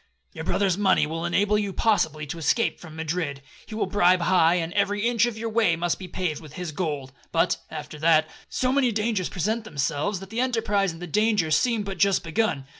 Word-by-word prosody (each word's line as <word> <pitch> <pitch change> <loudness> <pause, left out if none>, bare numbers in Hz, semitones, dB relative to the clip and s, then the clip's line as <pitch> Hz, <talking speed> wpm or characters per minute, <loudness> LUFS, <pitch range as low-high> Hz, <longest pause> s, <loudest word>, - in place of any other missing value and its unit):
Your - - -6
brother's 195 -2 +1
money 190 -6 +3
will 165 +2 -4
enable 205 +4 +2
you 200 -2 -2
possibly 160 -10 +1
to 165 +3 -6
escape 230 +9 +1
from 160 -3 -11
Madrid. 160 -3 -3 0.2
He 215 - -7
will 220 - 0
bribe 185 -2 +3
high, 170 -1 +4
and 170 -1 -2
every 205 +2 +1
inch 240 -1 +3
of 230 -2 -5
your 225 +1 -3
way 220 -6 +2
must 175 0 -1
be 185 - -7
paved 175 -4 -3
with 155 -2 -12
his 180 -2 -5
gold. 145 -5 -3 0.2
But, 165 - +2
after 150 -1 -8
that, 155 0 +4 0.2
so 255 0 0
many 265 -3 +2
dangers 210 -3 -1
present 215 +5 -1
themselves, 165 +1 -2
that 195 0 -11
the 225 - -3
enterprise 215 -6 +1
and 165 +2 -10
the - - -3
danger 210 -2 +1
seem 230 +4 +2
but 195 -1 -6
just 200 -2 +3
begun. 165 -5 -1
185 Hz, 210 wpm, -25 LUFS, 160-215 Hz, 0.2 s, high